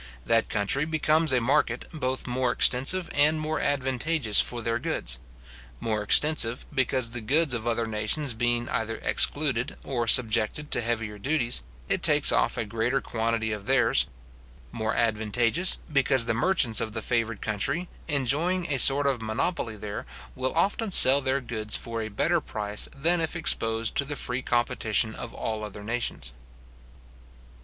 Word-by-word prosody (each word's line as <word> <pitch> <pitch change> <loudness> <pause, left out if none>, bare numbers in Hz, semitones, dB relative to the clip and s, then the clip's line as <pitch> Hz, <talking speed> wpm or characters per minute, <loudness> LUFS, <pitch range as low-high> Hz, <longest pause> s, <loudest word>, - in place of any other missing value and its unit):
That 115 0 +2
country 105 +7 0
becomes 155 0 +2
a 130 - +3
market, 125 -1 +1
both 130 -4 -2
more 125 0 0
extensive 135 +10 +2
and 150 +2 +3
more 155 0 -2
advantageous 135 -3 +1
for 120 -1 -2
their 115 0 -1
goods: 60 0 -3 0.6
more 110 -2 -1
extensive, 125 +1 +2
because 130 -2 0
the 120 0 -5
goods 145 +5 +1
of 120 -1 -3
other 115 0 0
nations 110 +6 -2
being 120 +1 0
either 115 0 -2
excluded 135 -5 0
or 120 -4 -2
subjected 120 +5 +1
to - - +1
heavier 115 -3 -3
duties, 130 0 -1 0.3
it - - 0
takes - - +5
off - - +1
a 115 - -1
greater 115 +5 0
quantity 115 -2 -2
of 105 0 -6
theirs; 130 -3 +3 0.6
more 110 -1 -2
advantageous, 115 - +2 0.2
because 135 -3 +2
the 115 - 0
merchants 120 - +2
of 110 -2 -3
the 110 -1 -4
favoured 115 -3 -1
country, 140 - -1 0.2
enjoying 155 +5 0
a 135 - 0
sort 140 +2 +3
of 135 -4 0
monopoly 115 +2 -2
there, 100 -7 -6 0.3
will 130 +2 -3
often 200 +6 +1
sell 140 -6 +6
their 130 +1 0
goods 110 -3 -3
for 115 -1 -5
a 110 - -4
better 165 +11 +1
price 105 -4 -2
than 165 +5 +1
if 160 +2 -3
exposed 115 -8 0
to - - +3
the 145 +1 -5
free 125 -2 -2
competition 115 -3 0
of 120 - -7
all 110 -1 -4
other 105 -1 -8
nations. 110 - -3
120 Hz, 160 wpm, -27 LUFS, 110-140 Hz, 0.6 s, sell